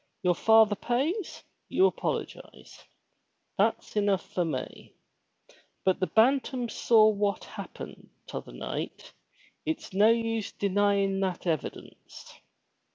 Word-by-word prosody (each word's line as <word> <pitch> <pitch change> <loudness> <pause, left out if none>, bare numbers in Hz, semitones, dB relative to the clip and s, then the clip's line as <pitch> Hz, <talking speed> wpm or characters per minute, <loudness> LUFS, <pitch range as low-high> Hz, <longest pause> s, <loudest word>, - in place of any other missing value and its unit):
Your 180 -1 +4
father 220 +2 +5
pays, 295 - -2 0.3
you 375 - +4
apologize. - - -4 0.8
That's - - 0
enough 205 -2 +1
for 180 - +1
me. 145 -6 -6 0.9
But 190 -1 +2
the 185 - 0
Bantam 250 +1 +2
saw 220 -2 +4
what 205 -1 0
happened - - -9 0.2
t - - -10
other - - -6
night. - - -6 0.5
It's 315 -10 -4
no 205 +3 +5
use 225 -2 0
your 200 -1 0
denyin' 200 -1 +2
that 185 -2 -2
evidence." 160 -4 -5
210 Hz, 115 wpm, -28 LUFS, 195-230 Hz, 0.9 s, father